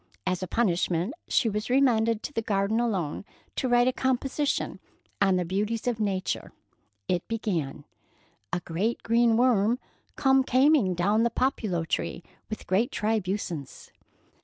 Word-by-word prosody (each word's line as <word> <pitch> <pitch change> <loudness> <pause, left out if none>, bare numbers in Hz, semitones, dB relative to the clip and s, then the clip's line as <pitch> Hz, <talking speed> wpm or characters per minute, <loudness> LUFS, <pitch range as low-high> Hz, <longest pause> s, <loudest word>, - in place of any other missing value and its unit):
As 185 -1 -1
a 185 - -3
punishment, 180 -1 0
she 240 - +2
was 210 +1 -2
remanded 230 -4 +3
to 295 - -5
the 225 - 0
garden 205 +1 0
alone 195 -11 -1 0.3
to 255 - -1
write 245 0 +4
a 255 - +2
composition 265 +3 -1 0.4
on 195 -1 +4
the 180 -1 0
beauties 210 +5 -2
of 240 -3 -1
Nature. 195 -3 -2 0.5
It 175 -1 -1
began: 170 -11 -3 0.7
A 180 - -1
great 195 +9 -2
green 230 0 +3
worm 235 -2 +3 0.4
come 265 -1 +4
cameing 255 - +3
down 205 +6 +2
the 235 - +3
populo 220 -9 -1
tree 170 - -2 0.3
with 215 - -6
great 200 +7 +2
tribusence. 195 - -3
220 Hz, 140 wpm, -27 LUFS, 185-240 Hz, 0.7 s, write